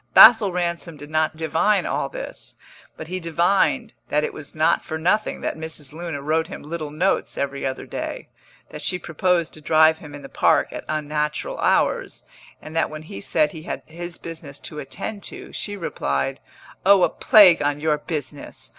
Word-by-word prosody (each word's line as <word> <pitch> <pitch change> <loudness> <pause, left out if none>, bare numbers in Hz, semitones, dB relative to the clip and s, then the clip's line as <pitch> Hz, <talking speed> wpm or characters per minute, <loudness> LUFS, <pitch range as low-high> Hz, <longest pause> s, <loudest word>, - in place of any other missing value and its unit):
Basil 220 -5 +9
Ransom 170 -2 -3
did 145 +1 -11
not 155 0 +1
divine 165 +6 +2
all - - -1
this, - - -7 0.4
but 160 - -7
he 185 +2 -3
divined 190 - +1 0.2
that 150 +1 +2
it - - -2
was 155 0 -10
not 155 +2 +2
for 160 - -4
nothing 180 +7 0
that - - -2
Mrs. 160 -3 -5
Luna 160 -4 -5
wrote 160 +2 +1
him - - -8
little 155 0 -5
notes 170 +6 0
every 140 -1 -2
other 130 - -5
day, - - -5 0.4
that 150 - -8
she 180 +4 -1
proposed 170 0 0
to 155 - -12
drive 160 +1 +4
him 150 -2 -10
in 145 - -10
the - - -7
Park - - +2
at - - -7
unnatural 150 0 -2
hours, - - +1 0.4
and 155 - -9
that 165 - +2
when 155 0 -8
he 100 -10 -8
said 150 +7 +1
he 160 - -9
had - - -5
his 175 +2 -7
business 160 -4 -8
to 150 - -7
attend 200 +8 -6
to, - - -9
she 205 -1 -4
replied: 70 - -2 0.4
"Oh, 195 -1 +6
a - - +4
plague 185 -7 +6
on 145 0 0
your 150 -1 +1
business! 150 -3 -6
160 Hz, 185 wpm, -23 LUFS, 150-175 Hz, 0.4 s, Basil